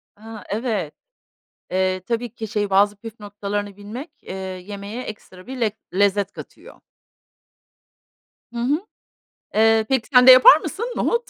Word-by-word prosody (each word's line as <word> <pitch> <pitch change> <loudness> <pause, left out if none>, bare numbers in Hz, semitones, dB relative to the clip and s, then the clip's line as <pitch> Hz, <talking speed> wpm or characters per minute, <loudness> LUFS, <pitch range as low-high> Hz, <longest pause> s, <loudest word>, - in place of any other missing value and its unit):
A, 220 +1 -11
evet. 210 - -2 0.8
Eee, 185 0 0
tabii 235 0 -3
ki 220 -1 -6
şey 205 -1 -2
bazı 205 +1 +3
püf 225 +1 -11
noktalarını 205 -1 -5
bilmek, 225 +10 -8
eee, 185 - -8
yemeğe 200 +4 -7
ekstra 190 -5 -11
bir 260 -1 -7
lek 215 -2 0 0.2
lezzet 200 0 +1
katıyor. - - -13 1.7
Hı 235 - -5
hı. 270 +5 +1 0.8
Eee, 220 0 +4
peki, 260 -4 0
sen 250 0 +6
de - - +11
yapar 255 +3 +9
mısın 455 - -5
nohut, 470 0 0
210 Hz, 140 wpm, -21 LUFS, 200-240 Hz, 1.7 s, de